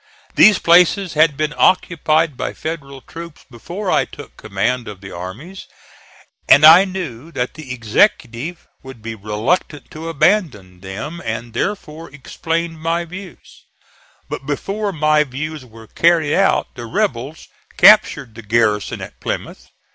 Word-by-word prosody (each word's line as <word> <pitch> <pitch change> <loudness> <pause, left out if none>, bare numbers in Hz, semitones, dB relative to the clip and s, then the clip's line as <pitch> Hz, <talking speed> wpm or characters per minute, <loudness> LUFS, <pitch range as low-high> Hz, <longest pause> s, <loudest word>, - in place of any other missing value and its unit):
These 215 -2 +6
places 180 +2 +3
had 150 -2 +3
been 155 0 -1
occupied 160 -4 +2
by - - -5
Federal 140 -4 -7
troops 165 +4 -11
before 180 - -5
I - - +2
took - - -13
command 115 +4 -2
of 100 -3 -9
the 95 0 -11
armies, 130 - -9 0.8
and 145 - +8
I 170 +5 +9
knew 170 -7 -7
that 125 -2 -3
the 155 -5 -10
Executive 125 - 0
would 130 -4 -12
be 115 0 -5
reluctant 110 - -2
to 160 +2 -7
abandon 135 - 0
them, 105 - -7
and 115 +1 -5
therefore 165 - -4
explained 165 +3 -4
my 165 +1 -1
views; 180 +1 -12 0.6
but 135 - -7
before 200 +8 -3
my 155 -2 +2
views 150 +2 -6
were 115 -1 -15
carried 160 +4 +2
out 195 +1 +1
the 120 -1 -8
rebels 125 +6 -3 0.3
captured 195 - +5
the 115 - -10
garrison 105 -1 0
at - - -10
Plymouth. - - -6
150 Hz, 140 wpm, -18 LUFS, 115-170 Hz, 0.8 s, I